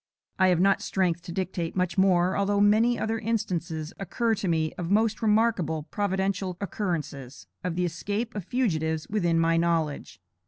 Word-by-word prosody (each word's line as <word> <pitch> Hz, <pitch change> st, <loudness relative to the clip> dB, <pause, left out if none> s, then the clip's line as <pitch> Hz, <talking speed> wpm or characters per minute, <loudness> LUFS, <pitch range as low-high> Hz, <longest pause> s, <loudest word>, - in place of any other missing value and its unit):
I 185 Hz, -, +5 dB
have 180 Hz, -2 st, +3 dB
not 195 Hz, +1 st, +3 dB
strength 175 Hz, -3 st, 0 dB
to 175 Hz, 0 st, -8 dB
dictate 180 Hz, -2 st, -3 dB
much 180 Hz, -2 st, 0 dB
more, 185 Hz, -1 st, +3 dB
although 200 Hz, 0 st, +1 dB
many 215 Hz, +4 st, +4 dB
other 225 Hz, +1 st, -1 dB
instances 175 Hz, -8 st, -2 dB
occur 225 Hz, +4 st, 0 dB
to 200 Hz, -2 st, -2 dB
me 160 Hz, -2 st, 0 dB
of 175 Hz, -2 st, -5 dB
most 220 Hz, +2 st, +2 dB
remarkable 210 Hz, -8 st, +2 dB
providential 190 Hz, -2 st, -1 dB
occurrences, 165 Hz, -, -4 dB, 0.2 s
of 180 Hz, -2 st, -2 dB
the 180 Hz, 0 st, +1 dB
escape 205 Hz, +7 st, -3 dB
of 205 Hz, -, -4 dB
fugitives 160 Hz, -9 st, -1 dB
within 175 Hz, -6 st, +1 dB
my 165 Hz, 0 st, +3 dB
knowledge. 165 Hz, -, -1 dB
185 Hz, 160 wpm, -27 LUFS, 165-205 Hz, 0.2 s, I